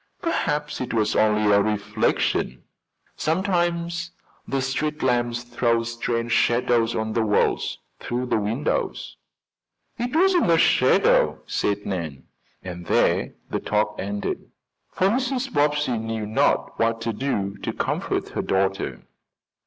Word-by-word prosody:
"Perhaps 150 Hz, -, -1 dB
it 125 Hz, -2 st, -3 dB
was 110 Hz, -1 st, +1 dB
only 105 Hz, -1 st, +3 dB
a 100 Hz, 0 st, +5 dB
reflection. 105 Hz, +1 st, 0 dB, 0.5 s
Sometimes 170 Hz, 0 st, 0 dB, 0.4 s
the 135 Hz, -, -1 dB
street 150 Hz, +4 st, -2 dB
lamps 120 Hz, -1 st, +1 dB
throw 120 Hz, -1 st, +1 dB
strange 115 Hz, 0 st, -2 dB
shadows 120 Hz, -1 st, +2 dB
on 110 Hz, 0 st, -2 dB
the 115 Hz, -, +1 dB
walls 105 Hz, -2 st, +1 dB, 0.2 s
through 125 Hz, +1 st, -3 dB
the 125 Hz, -, +1 dB
windows." 115 Hz, +8 st, -2 dB, 0.8 s
"It 245 Hz, +4 st, -2 dB
wasn't 355 Hz, -, +4 dB
a 165 Hz, -, +5 dB
shadow," -, -, +4 dB
said 100 Hz, 0 st, -1 dB
Nan; 85 Hz, -8 st, -4 dB, 0.4 s
and 90 Hz, -2 st, -7 dB
there -, -, +2 dB, 0.2 s
the -, -, 0 dB
talk 105 Hz, 0 st, 0 dB
ended, 100 Hz, +1 st, -3 dB, 0.4 s
for 185 Hz, -, +2 dB
Mrs. 255 Hz, +3 st, -1 dB
Bobbsey 145 Hz, -4 st, +1 dB
knew 110 Hz, -1 st, -3 dB
not 110 Hz, +1 st, +1 dB
what 115 Hz, 0 st, +1 dB
to 115 Hz, 0 st, -1 dB
say 100 Hz, -6 st, -2 dB
to -, -, -2 dB
comfort -, -, -1 dB
her -, -, -2 dB
daughter. 95 Hz, -9 st, -1 dB
115 Hz, 130 wpm, -24 LUFS, 105-150 Hz, 0.8 s, a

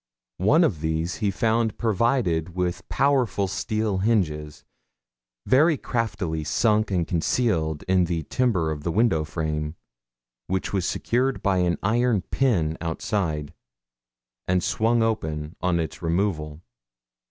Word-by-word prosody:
One 145 Hz, -, +4 dB
of 90 Hz, -, 0 dB
these 80 Hz, +2 st, -1 dB
he 105 Hz, -3 st, 0 dB
found 110 Hz, +3 st, 0 dB
provided 110 Hz, -, 0 dB
with 90 Hz, 0 st, -2 dB
powerful 130 Hz, -8 st, +1 dB
steel 105 Hz, +1 st, -1 dB
hinges, 80 Hz, -9 st, -1 dB, 0.8 s
very 150 Hz, +4 st, +4 dB
craftily 95 Hz, -12 st, -2 dB
sunk 110 Hz, +6 st, +2 dB
and 90 Hz, -4 st, 0 dB
concealed 80 Hz, -4 st, 0 dB
in 90 Hz, -1 st, +2 dB
the 85 Hz, -1 st, -2 dB
timber 90 Hz, -, 0 dB
of 75 Hz, -1 st, -4 dB
the 85 Hz, -, -2 dB
window 100 Hz, -6 st, +2 dB
frame, 75 Hz, 0 st, -3 dB, 0.7 s
which 95 Hz, +1 st, -2 dB
was 95 Hz, -3 st, 0 dB
secured 130 Hz, +3 st, 0 dB
by 95 Hz, -2 st, +2 dB
an 90 Hz, -1 st, +1 dB
iron 115 Hz, -1 st, +2 dB
pin 85 Hz, -, 0 dB
outside, 80 Hz, -3 st, -2 dB, 0.9 s
and 90 Hz, -1 st, +1 dB
swung 115 Hz, +1 st, +2 dB
open 80 Hz, -9 st, -2 dB
on 90 Hz, -2 st, +1 dB
its 80 Hz, -, -4 dB
removal. 85 Hz, -3 st, -1 dB
95 Hz, 125 wpm, -24 LUFS, 80-115 Hz, 0.9 s, One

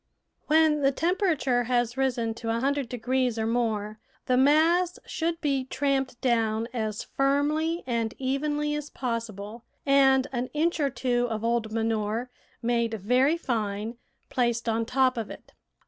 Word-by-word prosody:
When 310 Hz, -1 st, +4 dB
the 275 Hz, 0 st, +4 dB
temperature 315 Hz, -, +1 dB
has 240 Hz, 0 st, 0 dB
risen 245 Hz, -4 st, 0 dB
to 225 Hz, 0 st, -6 dB
a 230 Hz, +1 st, +1 dB
hundred 275 Hz, -1 st, 0 dB
degrees 250 Hz, 0 st, 0 dB
or 220 Hz, -, 0 dB
more 220 Hz, -2 st, -1 dB, 0.3 s
the 255 Hz, -, +2 dB
mass 320 Hz, +7 st, +4 dB
should 330 Hz, 0 st, -2 dB
be 275 Hz, -4 st, 0 dB
tramped 265 Hz, -2 st, -1 dB
down 225 Hz, -2 st, +1 dB
as 215 Hz, -3 st, -2 dB
firmly 300 Hz, +5 st, 0 dB
and 230 Hz, -3 st, -1 dB
evenly 295 Hz, +3 st, -1 dB
as 295 Hz, 0 st, -4 dB
possible 230 Hz, -3 st, -5 dB, 0.2 s
and 270 Hz, -1 st, +5 dB
an 250 Hz, -1 st, -2 dB
inch 335 Hz, +2 st, +1 dB
or 285 Hz, -2 st, +2 dB
two 245 Hz, -1 st, 0 dB
of 220 Hz, -1 st, -3 dB
old 230 Hz, -1 st, 0 dB
manure, 225 Hz, +2 st, -1 dB, 0.3 s
made 235 Hz, -1 st, +1 dB
very 250 Hz, -, +2 dB
fine, 220 Hz, -6 st, -2 dB, 0.3 s
placed 235 Hz, -2 st, 0 dB
on 225 Hz, 0 st, 0 dB
top 260 Hz, 0 st, +2 dB
of 225 Hz, -3 st, -3 dB
it. -, -, -12 dB
250 Hz, 145 wpm, -27 LUFS, 230-280 Hz, 0.3 s, and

